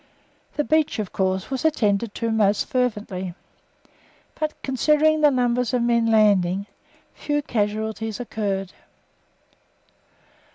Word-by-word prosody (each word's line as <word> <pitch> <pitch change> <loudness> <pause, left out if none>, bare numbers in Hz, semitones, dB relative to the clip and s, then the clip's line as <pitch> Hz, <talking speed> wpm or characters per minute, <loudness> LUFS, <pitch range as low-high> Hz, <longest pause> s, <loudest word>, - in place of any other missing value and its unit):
The 295 - +1
beach, 310 0 +1
of 210 -4 -4
course, 190 +3 -1
was 265 - -2
attended 215 -8 +1
to 230 -1 -1
most 210 -2 +2
fervently, 210 -8 -2 1.0
but 310 0 -4
considering 305 +3 +2
the 300 - +6
numbers 250 -2 +1
of 240 - +1
men 235 -1 +2
landing 200 -4 +3 0.5
few 295 -1 -2
casualties 220 -1 -2
occurred. 200 -5 -3
225 Hz, 110 wpm, -23 LUFS, 205-260 Hz, 1.0 s, the